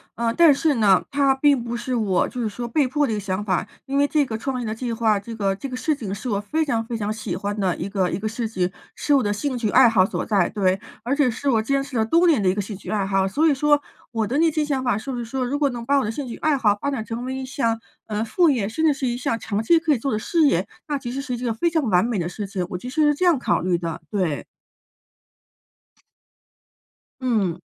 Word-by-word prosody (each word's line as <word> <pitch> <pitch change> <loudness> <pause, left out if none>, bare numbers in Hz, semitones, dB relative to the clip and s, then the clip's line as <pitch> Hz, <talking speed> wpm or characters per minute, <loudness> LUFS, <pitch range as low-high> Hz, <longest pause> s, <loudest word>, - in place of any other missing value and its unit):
呃， 230 0 0
但 335 -4 +7
是 300 0 +1
呢， 200 -5 +4
它 275 -1 +3
并 280 -1 +3
不 235 0 -4
是 255 +2 -3
我 210 -7 +1
就 250 - -7
是 230 - 0
说 225 +3 -5
被 265 +4 +1
迫 290 +3 +1
的 250 - -2
一 - - 0
个 - - -2
想 195 0 -3
法， 185 -4 -1 0.2
因 275 +1 -1
为 285 0 +4
这 295 -1 +2
个 220 -4 -4
创 260 +3 -3
业 - - -4
的 215 - -2
计 235 +1 -4
划， 220 -3 +2
这 225 +3 -8
个 200 -3 0
这 275 - -5
个 255 - -6
事 305 +5 0
情 215 -9 -5
是 230 +5 -5
我 200 -3 0
非 300 +11 -1
常 240 -7 0
非 235 - -4
常 210 -1 -2
喜 215 -4 -4
欢 205 +2 -3
的 185 -3 +1
一 - - -5
个 190 -3 0
一 - - -2
个 210 - -6
事 225 +1 -3
情， 185 -4 -1 0.2
是 295 - 0
我 275 - +4
的 205 -3 0
兴 255 +5 -2
趣 225 -3 -1
爱 250 +2 +6
好 195 -5 +4
所 - - -3
在。 200 -5 +2
对， 190 -2 0 0.2
而 245 - -1
且 285 -3 +3
是 260 +5 -2
我 225 -4 +3
坚 275 +5 0
持 275 -3 -5
了 220 - +2
多 335 +10 +3
年 320 -10 +4
的 195 - +1
一 185 - +4
个 205 - -1
兴 200 0 -7
趣 - - -10
爱 205 -2 0
好， 195 -1 +1
所 290 +12 +1
以 315 - +5
说 295 +1 +3 0.3
我 225 -1 0
的 250 +7 -1
那 325 +1 +4
些 310 0 0
想 285 -3 -1
法 250 -5 +1
是 270 +5 -5
不 250 - -4
是 235 - -4
说 255 +2 -2
如 280 +4 -2
果 285 -2 +3
能 235 -1 -6
把 280 +2 +3
我 275 - +1
的 215 - -1
兴 280 +5 -5
趣 235 -2 -7
爱 310 -2 +2
好 215 -6 +3
发 280 - 0
展 270 -6 -2
成 230 +3 -5
为 260 +1 -3
一 265 0 -4
项， 230 -4 -1 0.3
呃， 215 0 -2
副 335 +9 +3
业， 230 -8 0
甚 315 +8 -1
至 305 - +5
是 275 -1 -4
一 240 0 -1
项 240 -2 -1
长 215 -2 -2
期 330 +10 +4
可 320 -2 +2
以 - - +1
做 275 +4 -3
的 - - +1
事 315 +8 +2
业， 180 -7 +2 0.2
那 295 -2 -1
其 250 -3 -6
实 270 +2 -3
是 265 -3 -4
一 - - -5
个 235 -2 0
非 340 +10 +1
常 320 -2 0
完 180 +1 +4
美 235 -2 -1
的 175 -2 -2
事 205 +3 -5
情。 190 -2 -3
我 180 - -4
其 245 +8 -7
实 310 +5 0
是 295 - +4
这 330 +6 -1
样 345 -4 +5
考 250 - +1
虑 180 0 +1
的， 170 -1 -4
对。 180 -8 -1 2.8
嗯。 205 -9 0
235 Hz, 310 characters per minute, -23 LUFS, 205-275 Hz, 2.8 s, 但